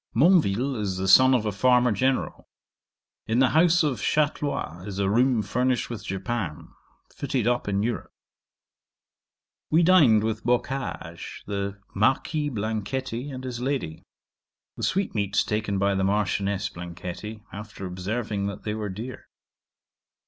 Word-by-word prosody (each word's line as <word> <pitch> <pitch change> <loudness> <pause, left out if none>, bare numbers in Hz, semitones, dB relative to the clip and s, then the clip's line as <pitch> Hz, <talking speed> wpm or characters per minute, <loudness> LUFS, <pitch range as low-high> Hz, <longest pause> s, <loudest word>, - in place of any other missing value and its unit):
'Monville 135 - +3
is 95 -3 -2
the 95 0 -2
son 130 +7 +7
of 115 -3 0
a 105 - 0
farmer 125 +4 +3
general. 130 +6 -1 0.8
In 110 - +1
the 130 0 +5
house 165 +1 +4
of 130 -9 -1
Chatlois 145 - -1
is 100 -2 -6
a 100 -1 +1
room 120 0 +3
furnished 125 +4 0
with 115 -3 -6
japan, 95 -4 -4 0.4
fitted 135 -5 -2
up 120 -1 +1
in 100 0 0
Europe. 120 +1 -3 1.6
'We 165 +3 +4
dined 150 - +6
with 110 0 -2
Boccage, 120 -8 -3
the 100 0 -3
Marquis 145 +8 +1
Blanchetti, 115 +3 -3
and 130 -2 -7
his 125 -2 -5
lady. 130 - -2 0.7
The - - -9
sweetmeats 100 - 0
taken 105 -2 -1
by 100 +1 +2
the 95 0 0
Marchioness 100 0 0
Blanchetti, 90 +5 -7
after 105 -1 -8
observing 100 +3 -3
that 100 - -6
they 105 - -2
were 105 -1 -3
dear. 115 +7 -7
110 Hz, 135 wpm, -25 LUFS, 100-130 Hz, 1.6 s, son